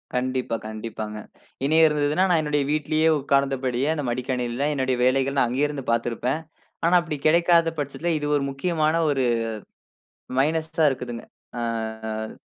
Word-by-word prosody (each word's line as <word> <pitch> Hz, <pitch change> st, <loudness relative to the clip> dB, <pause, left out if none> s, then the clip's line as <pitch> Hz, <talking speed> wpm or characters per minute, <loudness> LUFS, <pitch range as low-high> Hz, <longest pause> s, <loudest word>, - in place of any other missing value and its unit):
கண்டிப்பா, 130 Hz, -2 st, -1 dB
கண்டிப்பாங்க. 110 Hz, -1 st, -6 dB, 0.5 s
இனி 155 Hz, +3 st, +3 dB
இருந்ததுன்னா 150 Hz, +4 st, +1 dB
நான் 165 Hz, -3 st, +3 dB
என்னுடைய 150 Hz, -1 st, 0 dB
வீட்லயே 155 Hz, +1 st, +1 dB
உக்கார்ந்தபடியே 135 Hz, -1 st, 0 dB
அந்த 145 Hz, -3 st, -3 dB
மடிக்கணினியில 125 Hz, +2 st, -1 dB
என்னுடைய 130 Hz, -1 st, 0 dB
வேலைகள் 135 Hz, +2 st, +2 dB
நா 125 Hz, -, +4 dB
அங்கே 135 Hz, +4 st, +1 dB
இருந்து 145 Hz, -3 st, -6 dB
பாத்துருப்பேன். 120 Hz, +5 st, -1 dB, 0.4 s
ஆனா 175 Hz, +2 st, +4 dB
அப்படி 155 Hz, -3 st, -4 dB
கெடைக்காத 170 Hz, 0 st, +4 dB
பட்சத்தில 155 Hz, +4 st, -2 dB
இது 145 Hz, -, -3 dB
ஒரு 140 Hz, -, -1 dB
முக்கியமான 155 Hz, +2 st, 0 dB
ஒரு 135 Hz, -3 st, +1 dB, 1.2 s
மைனஸ்ஸா 160 Hz, +1 st, +1 dB
இருக்குதுங்க. 125 Hz, -2 st, -5 dB, 0.3 s
ஆ -, -, -2 dB, 0.5 s
ஆ. 110 Hz, 0 st, -4 dB
140 Hz, 135 wpm, -24 LUFS, 125-155 Hz, 1.2 s, நா